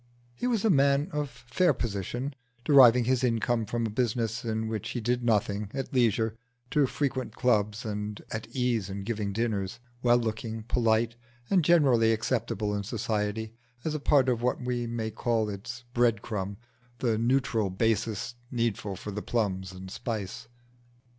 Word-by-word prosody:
He 245 - -2
was 230 -4 +1
a 220 - +5
man 140 +1 +3
of 150 -2 -2
fair 125 +6 +1
position, 120 +6 -3 0.3
deriving 125 -4 +7
his 130 +1 +1
income 115 -1 +1
from 115 +1 -1
a 110 - -2
business 115 0 -1
in 110 -1 -1
which 110 -2 -3
he 125 - -3
did 120 +2 0
nothing, 105 -3 +1
at 135 +2 -4
leisure 115 -3 +2 0.4
to 145 -2 +3
frequent 130 -1 -2
clubs 105 -2 +1
and 105 -1 -4
at 110 - -4
ease 120 -6 0
in 100 0 -5
giving 105 -2 -2
dinners; 105 -1 -1 0.2
well 120 -1 +5
looking, 110 -1 -3
polite, 115 0 +2 0.4
and 185 -4 +4
generally 135 -9 +5
acceptable 110 -2 -1
in 100 - -1
society 110 0 -2 0.3
as 160 - 0
a 155 - -2
part 140 -2 +4
of 120 -2 +1
what 125 +1 +1
we 125 -1 -2
may 115 -1 -3
call 115 -2 0
its 120 +5 -7
bread 120 -3 +2
crumb 100 -3 -3 0.4
the 115 -4 +1
neutral 120 -3 +1
basis 110 +3 0 0.2
needful 115 -5 -1
for 105 - -6
the 105 +1 -4
plums 95 -6 -1
and 95 0 -9
spice. 115 +2 -4
115 Hz, 160 wpm, -28 LUFS, 105-125 Hz, 0.4 s, deriving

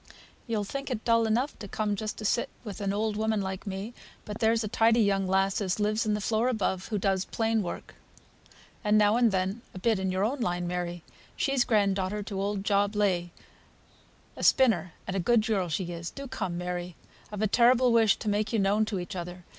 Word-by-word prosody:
"You'll 220 -3 -1
think 275 +7 -5
it 235 -4 -4
dull 230 -1 +3
enough 245 +6 0
to 205 - -7
come 210 +1 -1
just 215 +1 -4
to 215 - -6
sit 235 - +1
with 210 -3 -7
an 200 -1 0
old 210 +1 -1
woman 220 0 0
like 190 +1 -4
me, 195 +4 -5 0.3
but 210 +1 -6
there's 225 0 +2
a - - -2
tidy 230 +2 +3
young 195 -2 +2
lass 195 +2 +1
as 190 0 -1
lives 215 +2 +1
in 210 - +2
the - - -2
floor 220 +3 +1
above, 195 -6 -1
who 215 - -2
does 190 -1 +1
plain 225 -1 0
work, 175 - -6 0.9
and 210 0 +3
now 210 0 +4
and 235 -2 +4
then 190 +4 -1
a - - -6
bit 220 +1 +1
in 190 -1 -1
your 185 +1 0
own 265 +6 -2
line, 175 -6 -1
Mary; 175 -1 -3 0.3
she's 270 -3 +1
grand 205 -5 +2
daughter 195 +2 -2
to 195 -2 -4
old 200 0 -2
Job 205 0 +1
Legh, 185 -4 +1 1.1
a - - -7
spinner, 190 -10 +3
and 190 - -4
a - - +1
good 220 +3 +3
girl 195 -6 0
she 175 +2 -2
is. 170 0 -5
Do 275 0 -8
come, 190 -8 -3
Mary! 180 0 -4 0.4
I've 210 0 -3
a - - +3
terrible 245 +3 +4
wish 225 -3 +5
to - - -8
make 210 +1 0
you 230 - +1
known 205 +2 +2
to 210 -3 -3
each 180 +3 -6
other. 180 0 -7
205 Hz, 220 wpm, -28 LUFS, 190-225 Hz, 1.1 s, wish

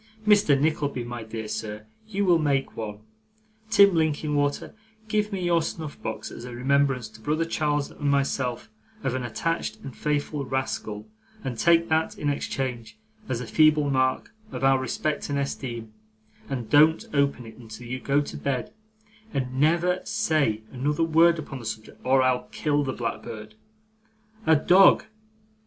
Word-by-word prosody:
Mr. 205 -10 +5
Nickleby, 145 -4 0
my 120 0 -6
dear 110 0 -6
sir, 105 0 -5 0.2
you 200 -1 -1
will 175 -3 +4
make 140 -3 0
one. 105 -2 -6 0.7
Tim 200 -3 +6
Linkinwater, 150 -3 0 0.3
give 210 -1 0
me 190 -2 -3
your 170 -1 +3
snuff 160 -2 -6
box 110 - -5
as - - -9
a 125 -1 -7
remembrance 135 -1 +1
to 110 0 -16
brother 155 +6 0
Charles 150 -3 -1
and 145 -1 -2
myself 135 - -1 0.3
of - - 0
an 130 - -2
attached 125 +1 -2
and 135 -3 -8
faithful 150 -1 -1
rascal, 120 -5 -3 0.4
and 130 -3 -3
take 170 0 +4
that, 160 0 +1
in 145 -1 0
exchange, 130 - -4 0.3
as 125 -1 -1
a - - -5
feeble 155 +2 +4
mark 130 -1 0 0.2
of - - -5
our 135 0 +5
respect 150 +3 -2
and 140 - -1
esteem, 120 -5 -4 0.6
and 125 -5 -3
don't 155 +2 +5
open 140 -3 +1
it 110 -1 -12
until 115 0 -10
you 130 +2 -4
go 140 +2 +2
to 145 - -6
bed, 135 - -3 0.6
and 130 -1 -2
never 170 +4 +3
say 155 - 0
another 145 +5 0
word 165 +1 +5
upon 140 -3 -6
the 115 - -10
subject, 110 0 -7
or 130 0 +4
I'll 130 -1 +1
kill 145 -1 0
the 135 - -2
blackbird. 110 -3 -5 0.9
A 160 - +7
dog! 180 +6 +6
140 Hz, 160 wpm, -26 LUFS, 125-155 Hz, 0.9 s, A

